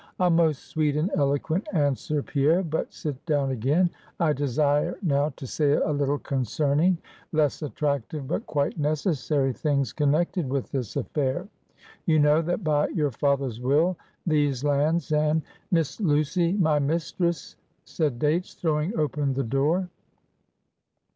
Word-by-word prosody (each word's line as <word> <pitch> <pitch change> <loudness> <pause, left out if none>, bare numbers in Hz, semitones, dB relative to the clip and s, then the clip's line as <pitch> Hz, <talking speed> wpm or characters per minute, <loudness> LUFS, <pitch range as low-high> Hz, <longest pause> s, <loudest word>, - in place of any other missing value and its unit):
"A 180 -1 +3
most 165 -4 +2
sweet 150 -2 0
and 160 +7 0
eloquent 145 +7 0
answer, 145 -1 0
Pierre; 155 +6 +2
but 160 -2 -2
sit 145 -4 -6
down 145 -4 +1
again. 140 +9 +2 0.3
I 160 -3 +3
desire 145 +4 +1
now 145 -3 +2
to - - -8
say 145 +2 +1
a 155 - +1
little 145 0 +1
concerning 145 - +1 0.4
less 155 -2 +1
attractive, 145 -1 -2
but 175 - -3
quite 145 +2 -1
necessary 145 -3 0
things 140 -4 0
connected 155 +2 +1
with 135 -1 -2
this 125 -6 -3
affair. 145 +5 -1 0.6
You 160 -2 +4
know, 150 +1 +4
that 175 +5 -2
by 150 -2 +2
your 150 -4 -1
father's 135 -2 0
will, 150 +8 +2 0.3
these 145 -5 +1
lands 150 +3 +1
and 155 +1 +2
" - - -37
"Miss 165 0 0
Lucy, 170 +1 +2
my 160 -7 +2
mistress;" 165 +2 -1 0.3
said 150 -7 -1
Dates, 155 +7 0
throwing 160 +5 -1
open 145 -2 0
the 135 - 0
door. 145 +9 +1
150 Hz, 140 wpm, -26 LUFS, 140-160 Hz, 0.6 s, You